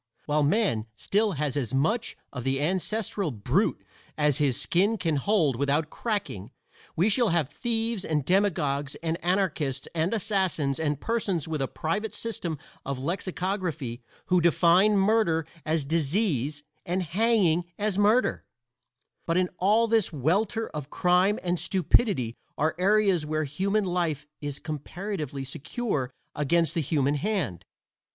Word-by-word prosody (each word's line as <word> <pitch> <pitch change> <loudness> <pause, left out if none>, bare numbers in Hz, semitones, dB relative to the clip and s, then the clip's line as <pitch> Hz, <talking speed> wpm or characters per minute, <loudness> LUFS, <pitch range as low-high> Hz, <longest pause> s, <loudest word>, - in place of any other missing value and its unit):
While 150 0 +1
man 145 - +1
still 210 - +1
has 145 -2 -2
as 130 -4 -1
much 215 - 0 0.2
of 125 -3 -5
the 135 +1 0
ancestral 190 +3 -1
brute 130 - 0 0.3
as 150 -2 +2
his 140 -5 +2
skin 200 +6 +2
can 165 -6 0
hold 160 - +2
without 140 +4 0
cracking 200 - -3 0.5
we 175 +6 +3
shall 220 +1 +3
have 165 -5 +1
thieves 225 -2 -1
and 150 -5 -1
demagogues 150 -7 +1
and 165 0 -2
anarchists 165 -8 0
and 165 +2 0
assassins 190 -10 0
and 150 -3 -1
persons 200 -8 -1
with 155 -3 -2
a 135 - 0
private 205 +10 -3
system 175 -8 -4 0.3
of 140 -1 -3
lexicography 170 - -3 0.2
who 180 -1 +3
define 175 +5 +4
murder 195 -6 +2 0.2
as 155 -2 0
disease 150 - 0 0.2
and 180 +2 -1
hanging 180 -2 +2
as 205 -1 -1
murder, 215 +5 +3 0.8
but 165 +1 +1
in 185 -1 +2
all 215 +5 +4
this 225 -3 +2
welter 195 - 0
of 150 -2 -6
crime 180 +5 +3
and 175 -1 0
stupidity 185 - +2 0.2
are 155 +2 +1
areas 195 -3 +3
where 155 +1 -1
human 195 +9 0
life 170 -6 -1 0.2
is 145 -1 -4
comparatively 155 -2 -5
secure 140 - -3 0.2
against 165 +3 +1
the 170 - 0
human 145 -1 +1
hand. 150 - -2
170 Hz, 140 wpm, -27 LUFS, 145-200 Hz, 0.8 s, define